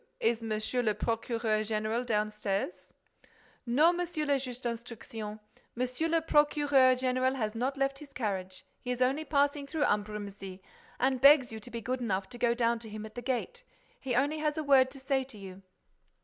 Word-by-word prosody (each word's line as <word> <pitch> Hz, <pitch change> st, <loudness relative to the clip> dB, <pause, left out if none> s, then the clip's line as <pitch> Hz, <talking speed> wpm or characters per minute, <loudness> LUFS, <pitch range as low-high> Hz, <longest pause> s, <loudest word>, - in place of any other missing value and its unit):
Is 235 Hz, -, +1 dB
Monsieur 225 Hz, +2 st, -1 dB
le 215 Hz, -3 st, +1 dB
Procureur 225 Hz, 0 st, 0 dB
Général 215 Hz, +2 st, -1 dB
downstairs?" 210 Hz, -4 st, -2 dB, 0.7 s
"No, 300 Hz, +9 st, +5 dB
Monsieur 345 Hz, -3 st, -2 dB
le 285 Hz, -2 st, +2 dB
Juge 250 Hz, -2 st, -6 dB
d'Instruction. 230 Hz, -2 st, -6 dB, 0.4 s
Monsieur 255 Hz, +6 st, -1 dB
le 330 Hz, 0 st, +2 dB
Procureur 290 Hz, -4 st, +4 dB
Général 255 Hz, +1 st, +1 dB
has 215 Hz, -5 st, -2 dB
not 255 Hz, +4 st, -2 dB
left 275 Hz, 0 st, 0 dB
his 290 Hz, -2 st, -12 dB
carriage. 190 Hz, -7 st, -4 dB
He 250 Hz, -, -8 dB
is 250 Hz, 0 st, -1 dB
only 270 Hz, +5 st, +1 dB
passing 285 Hz, -1 st, +1 dB
through 305 Hz, +1 st, -1 dB
Ambrumésy 205 Hz, -4 st, -2 dB, 0.4 s
and 260 Hz, 0 st, +1 dB
begs 275 Hz, -3 st, +7 dB
you 220 Hz, -, -6 dB
to 245 Hz, -, -12 dB
be 235 Hz, -1 st, -5 dB
good 255 Hz, +4 st, -2 dB
enough 195 Hz, -4 st, -1 dB
to 240 Hz, -, -9 dB
go 235 Hz, 0 st, +2 dB
down 235 Hz, -1 st, +1 dB
to 225 Hz, -1 st, -9 dB
him 215 Hz, 0 st, -6 dB
at 215 Hz, -, -10 dB
the 245 Hz, -, -6 dB
gate. 270 Hz, -, -3 dB, 0.4 s
He 255 Hz, -3 st, -2 dB
only 290 Hz, +5 st, +1 dB
has 300 Hz, 0 st, 0 dB
a 310 Hz, -, -1 dB
word 270 Hz, -2 st, +5 dB
to 270 Hz, +1 st, -11 dB
say 265 Hz, 0 st, 0 dB
to 255 Hz, -4 st, -12 dB
you." 190 Hz, -1 st, -10 dB
245 Hz, 185 wpm, -30 LUFS, 215-275 Hz, 0.7 s, begs